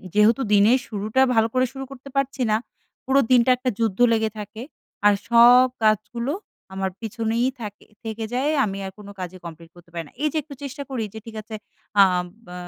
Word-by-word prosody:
যেহেতু 220 +5 +4
দিনের 215 +6 +5
শুরুটা 215 +4 0
ভালো 225 0 +4
করে 255 0 +3
শুরু 270 0 -6
করতে 275 +1 -11
পারছি 275 -1 -1
না, 215 - +4 0.5
পুরো 265 +1 +3
দিনটা 250 0 +5
একটা 255 +1 -1
যুদ্ধ 225 -2 0
লেগে 220 -1 +1
থাকে 210 +2 -8 0.4
আর 205 - +7 0.2
সব 245 +2 +7 0.2
কাজগুলো 235 +5 +1 0.4
আমার 190 0 -2
পিছনেই 230 +2 -1
থাকে 205 -1 -8 0.2
থেকে 225 0 -4
যায়। 270 +4 +1
আমি 195 -2 -4
আর 190 - -6
কোনো 200 -1 -10
কাজই 185 0 -6
কমপ্লিট 165 0 -10
করতে 175 -1 -18
পারি 170 - -4
না। - - -20
এইযে 305 +1 0
একটু 305 - -11
চেষ্টা 280 +1 -6
করি 255 -4 -2
যে, 220 - -7
ঠিক 225 -1 -10
আছে, 220 +1 -8 0.4
অ্যাঁম 180 -2 +5 0.2
ব্য 180 - -11
225 Hz, 190 wpm, -23 LUFS, 205-255 Hz, 0.5 s, আর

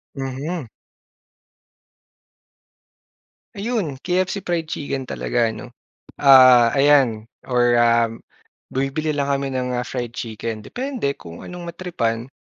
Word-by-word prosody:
Mhm. 135 +2 -4 2.9
Ayun, 200 - -2
KFC 185 +2 -1
fried 170 -2 -2
chicken 140 -4 -4
talaga, 120 -2 0
'no. 125 - -10 0.5
Ah 130 -4 +7
ayan 135 -6 +4 0.2
or, 120 -1 +3
um, 115 -1 +2 0.5
bumibili 135 +4 -1
lang 140 - 0
kami 140 0 -2
ng 125 -1 -2
ah, 125 - -1
fried 120 -2 -5
chicken, 110 -1 -5
depende 245 - -3
kung 85 0 -11
anong 180 -1 -8
matripan. 125 -10 -3
135 Hz, 105 wpm, -21 LUFS, 120-165 Hz, 2.9 s, Ah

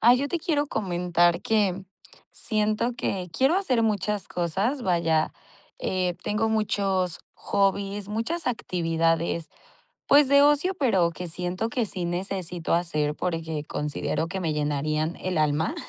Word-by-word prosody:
Ah, 240 +2 +7
yo 275 +3 0
te 345 - -1
quiero 300 -3 0
comentar 175 -6 +1
que, 210 -4 +2
mm, 190 +1 -9 0.5
siento 215 +2 0
que 185 -6 -3
quiero 265 - +3
hacer 260 -12 +1
muchas 210 -2 -1
cosas, 195 - -1
vaya, 170 -4 +1 0.5
eh, 180 -1 -1
tengo 215 +2 +1
muchos 195 -5 0
hobbies, 200 0 0
muchas 230 +11 -2
actividades, 165 -6 0 0.6
pues, 285 -1 +6
de 280 +1 +6
ocio, 295 +6 +3
pero 200 - +2
que 175 +1 -6
siento 180 +6 -2
que 230 0 -1
sí 185 -3 -4
necesito 175 -1 -2
hacer 155 -4 0
porque 160 -3 -3
considero 150 +2 -2
que 190 +2 -4
me 165 -3 0
llenarían 150 +2 -1
el 185 -3 -1
alma. 155 - +1
185 Hz, 140 wpm, -26 LUFS, 170-225 Hz, 0.6 s, Ah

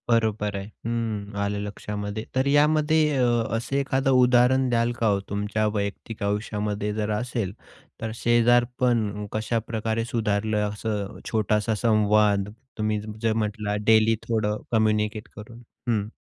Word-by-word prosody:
बरोबर 110 -3 +1
आहे. 95 - -5 0.2
हं, 110 -3 -3
आलं 100 0 -1
लक्षामध्ये. 105 +1 -5
तर 130 +1 +2
यामध्ये 150 +1 +3
अ, 130 - +3 0.3
असं 120 +4 -4
एखादं 135 -1 +1
उदाहरण 125 +1 +4
द्याल 120 0 +2
का 115 - +2
हो, 100 -2 +2
तुमच्या 105 +2 -1
वैयक्तिक 105 +1 -4
आयुष्यामध्ये 105 0 -2
जर 105 0 -2
असेल, 105 -3 -2 0.5
तर 115 - -3
शेजारपण 120 -2 +2
कशाप्रकारे 110 0 -2
सुधारलं? 110 -3 0
असं 105 -1 -4
छोटासा 110 0 +1
संवाद 105 -2 +3 0.3
तुम्ही 110 -1 0 0.2
जर 115 -1 +2
म्हटला, 105 -1 -2
डेली 110 0 +5
थोडं 110 -2 0
कम्युनिकेट 110 -1 +1
करून, 115 +3 -11 0.3
हं? 105 -3 +1
110 Hz, 125 wpm, -25 LUFS, 105-120 Hz, 0.5 s, डेली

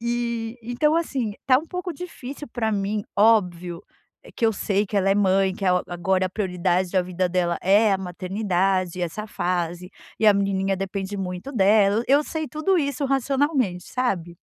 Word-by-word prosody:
E, 235 -1 -2
então 245 +7 +1
assim, 260 -10 -1
tá 255 -2 +6
um 315 - -8
pouco 360 0 -4
difícil 290 -4 -8
para 225 -2 -1
mim. 205 +1 -1
Óbvio 180 -5 +2 0.5
que - - -1
eu 225 - +2
sei 205 0 0
que 205 - -4
ela 195 0 +3
é 195 - +4
mãe, 195 -1 +2
que 195 - -6
é - - +3
é - - +5 0.2
agora 185 +2 0
a - - -7
prioridade 180 -2 0
da 185 -1 +2
vida 180 0 -1
dela 175 -1 0
é 205 +2 +4
a 190 - +1
maternidade, 185 -1 -1
essa 175 +5 -4
fase, 175 -2 -2 0.3
e 220 - +2
a 210 - +8
menininha 195 -1 0
depende 195 +1 -4
muito 180 +6 -5
dela. 205 -1 +4
Eu 285 +3 +4
sei 315 -1 -4
tudo 335 +5 +1
isso 280 -2 -1
racionalmente, 270 - 0
sabe? 185 -10 -2
200 Hz, 180 wpm, -24 LUFS, 185-240 Hz, 0.5 s, a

